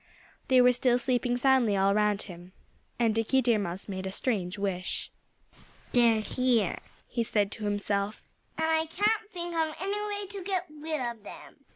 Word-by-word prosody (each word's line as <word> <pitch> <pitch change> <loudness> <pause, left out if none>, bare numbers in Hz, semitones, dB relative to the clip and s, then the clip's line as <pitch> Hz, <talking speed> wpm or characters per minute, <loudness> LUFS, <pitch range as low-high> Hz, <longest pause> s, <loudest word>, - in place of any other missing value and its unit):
They 255 -1 +6
were 250 0 +6
still 245 0 +3
sleeping 245 -1 0
soundly 245 -5 +3
all 195 +1 +3
around 210 0 +2
him. 180 -1 -11 0.4
And 230 -2 +2
Dickie 225 +4 +2
Deer 235 -3 +3
Mouse 185 -1 -4
made 190 -1 -4
a - - -4
strange 195 -4 -1
wish. 195 -2 -2 0.8
"They're 235 -3 +4
here," 235 -4 +1 0.3
he 235 -1 -1
said 210 -2 0
to 215 - -6
himself. 205 0 -2 0.3
"And 320 - +1
I 320 0 +2
don't 410 0 -1
know 325 -2 +1
of 310 - -9
any 410 +2 -2
way 410 -1 -3
to 395 0 -8
get 370 -1 -1
rid 305 0 -4
of 235 -3 -4
them. - - -12
240 Hz, 175 wpm, -29 LUFS, 205-315 Hz, 0.8 s, They